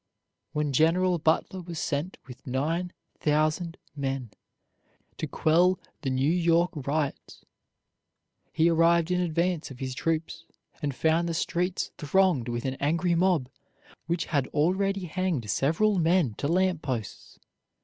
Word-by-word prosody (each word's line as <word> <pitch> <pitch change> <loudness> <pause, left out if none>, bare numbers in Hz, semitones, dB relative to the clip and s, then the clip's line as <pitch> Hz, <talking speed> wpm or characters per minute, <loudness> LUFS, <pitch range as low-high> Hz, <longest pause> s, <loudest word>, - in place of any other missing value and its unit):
When 150 -2 -1
General 175 +5 +3
Butler 165 +4 +1
was 170 -1 -7
sent 150 +5 -2
with 130 +1 -13
nine 160 +8 -1 0.3
thousand 155 +3 0 0.2
men 135 -5 -3 0.9
to - - -3
quell 175 +3 +3 0.2
the 135 - -2
New 130 +3 +1
York 170 0 +3 0.2
riots, 145 -1 -3 1.1
he 160 +1 +3
arrived 170 +1 +3
in 180 0 +2
advance 170 0 0
of 135 - -10
his 130 0 -4
troops, 165 +3 -2 0.4
and 145 -3 -2
found 165 +3 +2
the 165 - -2
streets 175 +2 -1
thronged 155 -5 +2
with 120 +1 -3
an 135 0 -2
angry 170 +5 +1
mob, 170 -6 +2 0.6
which 170 0 -1
had 140 -5 0
already 190 +5 0
hanged 170 - -2
several 185 +8 +2
men 165 - +2
to 140 - -1
lamp 180 0 +1
posts. 125 -7 -5
165 Hz, 135 wpm, -27 LUFS, 140-180 Hz, 1.1 s, General